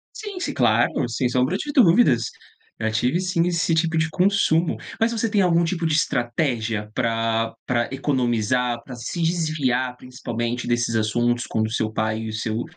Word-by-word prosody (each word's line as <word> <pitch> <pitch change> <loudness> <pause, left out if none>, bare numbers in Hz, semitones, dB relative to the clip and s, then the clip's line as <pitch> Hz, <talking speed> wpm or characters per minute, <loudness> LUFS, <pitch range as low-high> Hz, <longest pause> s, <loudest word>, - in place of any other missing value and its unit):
Sim, 410 -4 -6
si - - -3
claro, 120 0 +2
sem 125 +2 0
sombra 125 +8 +1
de 290 - -4
dúvidas. 175 - +4 0.5
Já 110 0 -1
tive 125 +10 +1
sim 180 -2 0
esse 170 -1 +1
tipo 160 0 +1
de 160 0 +1
consumo. 180 -2 +2 0.2
Mas 225 +1 +2
você 225 -1 -1
tem 205 -1 +2
algum 170 -2 +3
tipo 170 0 -1
de 155 - 0
estratégia 120 -6 -1
pra 115 -1 0
pra 120 -2 0
economizar, 125 -3 0
pra 125 0 -9
se 145 +8 -5
desviar 155 -7 0
principalmente 120 -2 -4
desses 120 -1 0
assuntos 120 +2 +1
quando 110 0 0
o - - -8
seu 110 -1 -1
pai 110 0 -1
e 110 0 -5
o - - -6
seu 110 +1 -2
125 Hz, 175 wpm, -23 LUFS, 115-165 Hz, 0.5 s, dúvidas